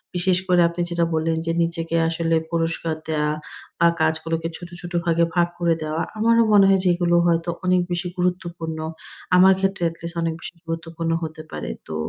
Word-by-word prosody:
বিশেষ 180 +1 +2
করে 180 -1 +4
আপনি 170 +1 -4
যেটা 170 -1 +1
বললেন 160 +1 0
যে 165 - 0
নিজেকে 165 0 -2
আসলে 165 0 0 0.2
পুরস্কার 165 -1 -1
দেওয়া 150 -1 0 0.5
আ - - +8
কাজগুলোকে 160 +1 0
ছোট, 175 -1 -10
ছোট 175 0 -8
ভাগে 170 0 +3
ভাগ 175 -1 +4
করে 170 -1 +3
দেওয়া। 155 +1 -2 0.2
আমারও 230 +1 +4
মনে 200 -1 +7
হয় 195 -1 +4
যেগুলো 175 -1 +3
হয়তো 170 0 +1 0.2
অনেক 180 0 +3
বেশি 175 +1 -1
গুরুত্বপূর্ণ। 175 -3 -2 0.6
আমার 190 +1 +7
ক্ষেত্রে 195 -2 -1
at 165 - -12
least 170 +1 -6
অনেক 165 -1 0
বেশি - - -8
গুরুত্বপূর্ণ 165 0 -3
হতে 160 0 -6
পারে। - - -5 0.2
তো 80 - -5
170 Hz, 180 wpm, -22 LUFS, 165-180 Hz, 0.6 s, আ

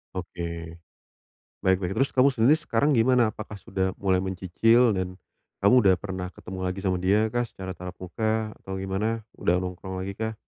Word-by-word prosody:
Oke. 85 -2 -5 0.9
Baik 95 -1 +4
baik, 90 0 -2
terus 135 - +2
kamu 130 +1 +5
sendiri 125 +7 +4
sekarang 145 0 +1
gimana? 120 -2 +4
Apakah 110 0 -8
sudah 95 -1 -2
mulai 95 -2 +1
mencicil 95 +6 +3
dan 95 -2 -2 0.5
kamu 100 +4 +6
udah 95 -5 +5
pernah 95 -1 -5
ketemu 95 0 -8
lagi 90 +1 -3
sama 95 -2 +1
dia 105 +5 +2
kah 120 +1 0
secara 95 -4 -8
tatap 90 0 -7
muka 110 +4 -1
atau 95 - -7
gimana, 100 +4 -2 0.2
udah 90 +1 +1
nongkrong 90 +1 -6
lagi 100 +1 -4
kah? 110 0 -2
95 Hz, 170 wpm, -26 LUFS, 90-110 Hz, 0.9 s, kamu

